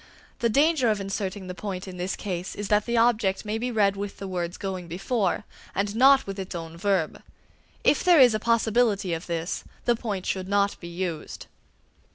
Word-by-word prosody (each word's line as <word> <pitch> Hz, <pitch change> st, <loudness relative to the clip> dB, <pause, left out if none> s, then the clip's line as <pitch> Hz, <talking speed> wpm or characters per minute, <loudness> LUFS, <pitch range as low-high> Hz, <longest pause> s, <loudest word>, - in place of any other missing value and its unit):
The 235 Hz, -, +2 dB
danger 285 Hz, 0 st, +3 dB
of 210 Hz, -1 st, +1 dB
inserting 195 Hz, 0 st, -4 dB
the 180 Hz, -, -5 dB
point 190 Hz, 0 st, -5 dB
in 185 Hz, -1 st, -8 dB
this 180 Hz, +2 st, -2 dB
case 180 Hz, -2 st, -4 dB
is 205 Hz, -1 st, -5 dB
that 210 Hz, +1 st, +2 dB
the 235 Hz, 0 st, +1 dB
object 220 Hz, -4 st, +2 dB
may 215 Hz, +1 st, -2 dB
be 250 Hz, +2 st, -2 dB
read 205 Hz, -4 st, +2 dB
with 200 Hz, 0 st, -5 dB
the 195 Hz, -, -6 dB
words 175 Hz, -2 st, -3 dB
going 190 Hz, -3 st, -4 dB
before, 195 Hz, +4 st, -1 dB, 0.3 s
and 200 Hz, +1 st, -1 dB
not 270 Hz, +3 st, +6 dB
with 195 Hz, 0 st, -6 dB
its 190 Hz, -1 st, -5 dB
own 165 Hz, -1 st, -6 dB
verb. 190 Hz, -2 st, 0 dB, 0.6 s
If -, -, +3 dB
there 355 Hz, -3 st, +6 dB
is 250 Hz, -3 st, +7 dB
a 215 Hz, -, 0 dB
possibility 225 Hz, -4 st, +2 dB
of 165 Hz, +1 st, -5 dB
this, 170 Hz, 0 st, -3 dB, 0.2 s
the 240 Hz, -, +3 dB
point 210 Hz, -5 st, -4 dB
should 185 Hz, -1 st, -2 dB
not 200 Hz, 0 st, +1 dB
be 170 Hz, -, -8 dB
used. 170 Hz, -2 st, -5 dB
200 Hz, 200 wpm, -26 LUFS, 185-225 Hz, 0.6 s, is